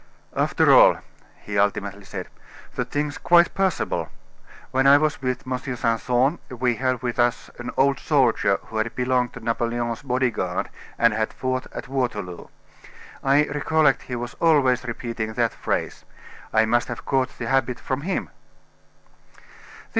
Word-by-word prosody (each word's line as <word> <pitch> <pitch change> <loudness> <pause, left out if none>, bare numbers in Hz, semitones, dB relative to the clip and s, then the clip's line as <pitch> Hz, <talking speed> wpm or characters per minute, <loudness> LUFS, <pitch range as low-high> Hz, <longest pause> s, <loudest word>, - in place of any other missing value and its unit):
"After - - +3
all," - - +7 0.5
he 100 -1 -2
ultimately 100 0 -1
said, 95 -2 -6 0.5
"the - - -2
thing's 145 +1 -3
quite 170 0 +4
possible. 190 -2 -1 0.6
When 135 +1 +3
I 140 +1 +8
was 155 0 0
with 125 -1 -2
M. 130 0 -2
Simpson, 125 - 0
we 125 -2 -1
had 130 -1 -1
with 120 -1 -3
us 120 0 +1
an 120 - -5
old 140 +1 +3
soldier 120 -9 +2
who 110 - -7
had 110 +2 -1
belonged 125 -1 0
to - - -8
Napoleon's 120 0 -1
body 130 -2 0
guard - - -3 0.3
and 115 -2 +4
had 110 0 -1
fought 130 0 -3
at - - -7
Waterloo. 110 -9 -3 0.8
I 140 +2 +4
recollect 150 -1 +2
he 125 - -2
was 120 0 -5
always 140 -7 +3
repeating 115 -2 -4
that - - 0
phrase. - - -3 0.5
I 110 0 +4
must 120 +2 +1
have - - -7
caught 130 -1 0
the 120 - -4
habit 130 0 0
from 130 +1 -3
him." 185 +5 -3
125 Hz, 150 wpm, -23 LUFS, 115-135 Hz, 0.8 s, I